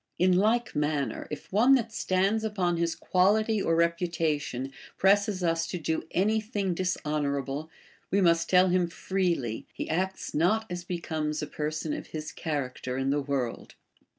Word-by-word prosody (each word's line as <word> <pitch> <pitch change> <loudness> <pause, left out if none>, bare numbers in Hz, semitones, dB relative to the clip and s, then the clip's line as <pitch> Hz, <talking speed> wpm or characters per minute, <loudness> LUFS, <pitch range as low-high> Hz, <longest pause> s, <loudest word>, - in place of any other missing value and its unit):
In 180 +1 +4
like 225 +5 +2
manner, 150 -2 -1
if 150 +4 -8
one 245 +7 +6
that 230 -3 -1
stands 195 +4 +1
upon 185 -5 0
his 165 -1 0
qiuiHty 210 +3 +2
or 165 - +2
reputation 165 -6 0 0.3
presses 200 0 +3
us 165 -1 +1
to 180 - -3
do 160 -1 -2
any 215 +4 +2
thing 205 -4 -2
dishon 180 +1 -1 0.2
orable, 140 +2 -2 0.4
wo 200 - +3
must 170 -1 +3
tell 185 0 +5
him 180 -1 +2
freely, 170 - -2
he - - -5
acts 190 +4 -2
not 185 +8 +2
as 175 0 -4
becomes 160 -3 -3
a - - -1
person 155 +1 -3
of - - -5
his 155 -1 -6
cliaracter 130 -4 -3
in 135 +1 +1
the 145 +1 +1
world. 135 -4 -3
170 Hz, 160 wpm, -28 LUFS, 150-195 Hz, 0.4 s, one